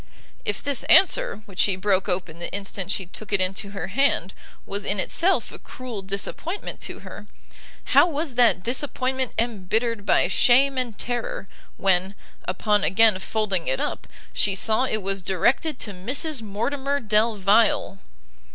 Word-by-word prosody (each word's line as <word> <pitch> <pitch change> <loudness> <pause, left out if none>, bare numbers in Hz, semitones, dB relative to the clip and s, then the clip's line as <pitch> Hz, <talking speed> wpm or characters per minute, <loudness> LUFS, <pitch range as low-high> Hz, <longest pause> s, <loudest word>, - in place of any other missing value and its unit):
If 205 - -3
this 280 -2 0
answer, 440 - +3
which 195 -3 -12
she 195 - +3
broke 190 +1 0
open 175 -2 -3
the 170 - -5
instant 195 -1 -3
she 195 -1 -2
took 205 +4 -9
it 200 - +2
into 190 +2 -2
her 195 0 -5
hand, 220 -5 +1 0.3
was 200 +1 -3
in 205 0 -1
itself 355 - +1
a - - -11
cruel 250 -5 -8
disappointment 200 - -3
to - - -6
her, - - -11 0.7
how 355 - +7
was 305 -3 -3
that 235 -6 +3
disappointment 260 0 -1
embittered 225 0 -1
by - - +3
shame 265 +2 +4
and 240 -4 -4
terror, 240 -5 -3 0.3
when, 190 0 +1 0.3
upon 205 +2 0
again 210 +1 +4
folding 195 -4 -2
it 130 - 0
up, - - -4 0.3
she 195 -2 +1
saw 220 +5 +5
it 215 -5 -2
was 195 0 -2
directed 240 - 0
to 210 - -3
Mrs 255 - -2
Mortimer 265 +7 -2
Delvile! 215 -2 +2
210 Hz, 150 wpm, -23 LUFS, 195-255 Hz, 0.7 s, how